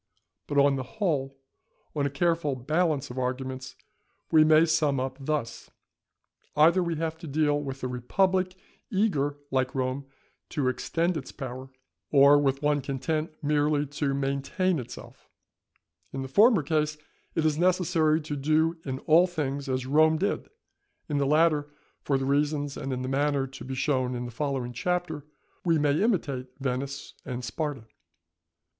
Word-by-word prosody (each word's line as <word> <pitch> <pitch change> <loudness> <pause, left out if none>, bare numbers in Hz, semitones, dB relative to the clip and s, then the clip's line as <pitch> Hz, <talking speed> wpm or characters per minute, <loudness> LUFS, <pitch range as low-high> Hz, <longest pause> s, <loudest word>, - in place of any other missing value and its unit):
But, 145 - -2
on 140 -1 +5
the - - -2 0.2
whole, 140 -9 -1 0.6
on 145 -1 +1
a - - -2
careful 160 0 0
balance 145 +1 0
of 125 - -5
arguments 130 +1 -4 0.6
we 155 -1 +7
may 155 +1 +6
sum 155 -4 +2
up 130 0 -3
thus:—Either 150 +4 -2
we 170 -2 -1
have 160 0 -3
to 165 - -8
deal 145 0 +1
with 135 -2 -6
a - - 0
republic 185 +9 0 0.3
eager 165 - +1
like 130 -1 0
Rome 130 +1 -2 0.4
to 135 -4 0
extend 165 +6 -1
its 135 - -7
power, 130 -1 -7 0.4
or 140 0 +7
with 135 0 0
one 145 -1 +2
content 155 +4 -2
merely 150 0 +2
to 145 -1 -2
maintain 140 +6 0
itself; 125 -1 -10 0.8
in 135 0 -4
the - - -5
former 205 - +5
case 150 +1 0 0.4
it 160 - +1
is 155 0 +1
necessary 175 -3 +3
to 150 -1 -4
do 155 +4 +1
in 130 -2 -3
all 170 +4 +5
things 145 -5 -3
as 130 -1 -1
Rome 155 +3 +4
did; 200 +5 -2 0.6
in 145 -1 0
the 140 - +1
latter, 150 -1 +3 0.3
for 140 - +1
the 135 - -2
reasons 145 0 0
and 135 -1 -4
in 130 0 -2
the - - -3
manner 140 0 +1
to 135 0 -10
be 130 0 -5
shown 130 -2 0
in 120 0 -4
the 120 - -6
following 130 -1 -2
Chapter, 160 +1 -2 0.4
we 165 -2 +3
may 145 +2 +2
imitate 145 - 0
Venice 135 +1 -3
and 125 -2 -5
Sparta. 140 0 -4
145 Hz, 155 wpm, -27 LUFS, 135-160 Hz, 0.8 s, we